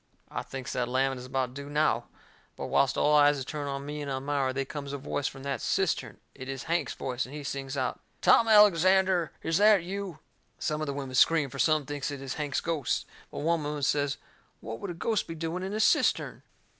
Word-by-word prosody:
I - - -3
thinks 135 -1 -6
that 125 -1 0
lamming 130 +1 0
is 125 - -8
about 130 -1 -1
due 140 +1 -7
now. 150 +1 +1 0.5
But - - -5
whilst 135 - +2
all 150 - +3
eyes 145 0 +6
is 135 - -4
turned 145 0 -4
on 140 0 -4
me 150 +1 -5
and 145 - -4
Elmira, 135 0 -1
they 135 +1 -2
comes 140 0 -6
a - - -2
voice 140 +1 -2
from 135 -1 -8
that 140 -1 -3
cistern. - - 0 0.2
It 130 +1 -9
is 135 -3 -4
Hank's 170 +1 -1
voice, 125 -1 -3
and 140 - -10
he 150 - -6
sings 140 0 -4
out: 130 -1 -1 0.2
"Tom 230 - +5
Alexander, 190 -4 +5
is 165 +2 +1
that 210 -3 +6
you?" 190 -2 -5 0.4
Some 150 0 -2
of 155 - -2
the 140 - -2
women 135 -2 -5
scream, 145 +1 +4
for - - -8
some 155 -2 +3
thinks 145 0 -3
it 145 -1 -5
is 135 -1 -5
Hank's 145 -2 -2
ghost. 160 -6 -1 0.2
But - - -6
one 165 0 +1
woman 145 0 -3
says 145 0 +1 0.4
what 115 +1 -7
would 200 - -5
a 175 - -5
ghost 215 +5 -1
be 165 - -6
doing 165 +3 -3
in 190 +1 -4
a 215 - -2
cistern? - - +2
145 Hz, 225 wpm, -29 LUFS, 135-165 Hz, 0.5 s, eyes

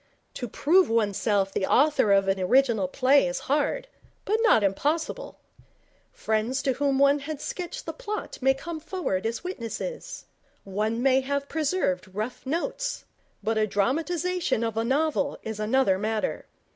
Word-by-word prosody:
To 245 - -5
prove 350 - +3
oneself 205 -3 +1
the 190 - 0
author 285 -7 +4
of 195 -1 +4
an 195 0 +1
original 220 0 +3
play 265 +3 +3
is 175 - -3
hard, 300 - 0 0.4
but 430 +3 +1
not 445 - +5
impossible. 300 - -1 0.7
Friends 235 - -1
to 265 - +2
whom 275 +1 +1
one 280 +1 +4
had 290 +1 -6
sketched 350 +3 -5
the - - -4
plot 425 -4 -5
may 270 +1 +4
come 320 +4 -6
forward 310 - -2
as 230 +6 -4
witnesses. 355 - -5 0.4
One 215 +4 -2
may 265 0 +4
have 280 +1 -2
preserved 280 - -1
rough 225 +5 -4
notes. - - -2 0.4
But 220 +1 0
a 215 - +2
dramatization 325 - 0
of 225 -1 -2
a 225 - 0
novel 285 +2 0
is 220 -1 -5
another 215 -3 +2
matter. 215 +1 -2
265 Hz, 150 wpm, -26 LUFS, 215-315 Hz, 0.7 s, not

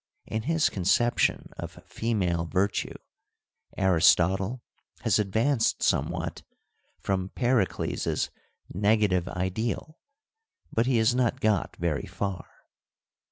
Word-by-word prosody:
In 110 - -3
his 160 +5 +2
conception 100 +6 +1
of - - -7
female 90 -7 -1
virtue 95 +4 -1 0.8
Aristotle 95 +5 +3 0.4
has - - +2
advanced 110 +5 +1
somewhat - - 0 0.6
from 95 -1 -2
Pericles' 120 -5 0 0.4
negative 100 -2 +2
ideal, 110 - -3 0.7
but 115 +2 +2
he 130 -3 +3
has 110 +2 +3
not 125 +1 +1
got 110 -7 +1
very 85 -4 -2
far. 100 -4 -4
105 Hz, 95 wpm, -27 LUFS, 95-120 Hz, 0.8 s, Aristotle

